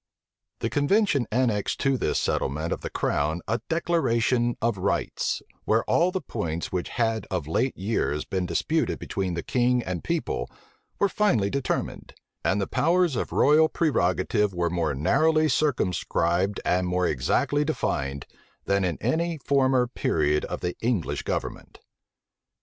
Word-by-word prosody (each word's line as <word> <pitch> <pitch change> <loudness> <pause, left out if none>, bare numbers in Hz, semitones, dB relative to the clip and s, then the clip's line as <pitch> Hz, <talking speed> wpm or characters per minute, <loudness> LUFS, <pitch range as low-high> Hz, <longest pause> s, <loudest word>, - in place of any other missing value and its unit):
The - - 0
convention 145 - +2
annexed 115 -4 0
to 135 -1 +2
this - - 0
settlement 75 +5 -1
of - - -6
the - - -4
crown 80 +4 -1
a 115 +3 -1
declaration 125 -8 +1
of 115 -4 0
rights, 100 +2 -1 0.2
where - - +2
all 175 +2 +2
the 190 +1 -2
points 85 -7 -4
which 90 -2 -2
had 115 -3 -1
of 90 -6 -2
late 120 +11 0
years 95 -7 -1
been 95 -2 -2
disputed 155 - 0
between 95 -3 -3
the 85 - -3
king 125 -1 +1
and 90 -4 -4
people, 170 -1 -2 0.5
were 200 - +3
finally 135 - +1
determined; 140 -2 -3 0.3
and 95 - +1
the 100 - 0
powers 170 - +2
of - - -2
royal 155 +2 +5
prerogative 105 - +1
were 85 -1 0
more 80 -5 0
narrowly 155 - +3
circumscribed 95 - 0
and 90 0 +1
more 90 0 +1
exactly 80 - +1
defined, 70 - -2 0.4
than 100 0 +1
in 90 -4 -1
any 170 +1 0
former 130 -3 +2
period 75 -10 0
of - - -5
the 90 0 -2
English 115 -8 -1
government. - - -4
110 Hz, 145 wpm, -26 LUFS, 90-145 Hz, 0.5 s, royal